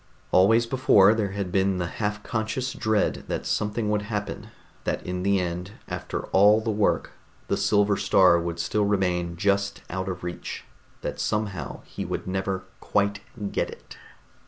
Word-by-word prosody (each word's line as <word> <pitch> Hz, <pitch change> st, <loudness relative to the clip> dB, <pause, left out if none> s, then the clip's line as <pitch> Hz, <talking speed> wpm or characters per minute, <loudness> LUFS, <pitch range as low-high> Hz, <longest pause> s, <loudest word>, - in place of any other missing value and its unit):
Always 115 Hz, +6 st, +5 dB
before 115 Hz, -5 st, +5 dB
there 105 Hz, -3 st, -1 dB
had 100 Hz, -3 st, -3 dB
been 95 Hz, 0 st, +2 dB
the 90 Hz, -, -1 dB
half 105 Hz, +3 st, -3 dB
conscious 120 Hz, +3 st, -2 dB
dread 110 Hz, -5 st, 0 dB
that -, -, -3 dB
something 105 Hz, 0 st, 0 dB
would 105 Hz, -1 st, +1 dB
happen, 105 Hz, -1 st, -4 dB, 0.4 s
that -, -, -2 dB
in 90 Hz, 0 st, -3 dB
the 100 Hz, +1 st, +2 dB
end, 90 Hz, +2 st, -3 dB
after -, -, -4 dB
all 105 Hz, +3 st, +6 dB
the 110 Hz, 0 st, -1 dB
work, 105 Hz, -1 st, +1 dB, 0.4 s
the -, -, +2 dB
silver 105 Hz, -1 st, +3 dB
star 95 Hz, -3 st, +5 dB
would 85 Hz, 0 st, -3 dB
still 100 Hz, +5 st, 0 dB
remain 90 Hz, -4 st, 0 dB
just 100 Hz, +1 st, 0 dB
out 95 Hz, +1 st, -2 dB
of 90 Hz, -1 st, -5 dB
reach, 85 Hz, 0 st, -5 dB, 0.4 s
that -, -, -4 dB
somehow 100 Hz, -9 st, -2 dB
he -, -, -6 dB
would -, -, -4 dB
never 95 Hz, 0 st, -2 dB, 0.2 s
quite 100 Hz, 0 st, 0 dB, 0.3 s
get -, -, 0 dB
it. -, -, -12 dB
100 Hz, 160 wpm, -26 LUFS, 95-105 Hz, 0.4 s, all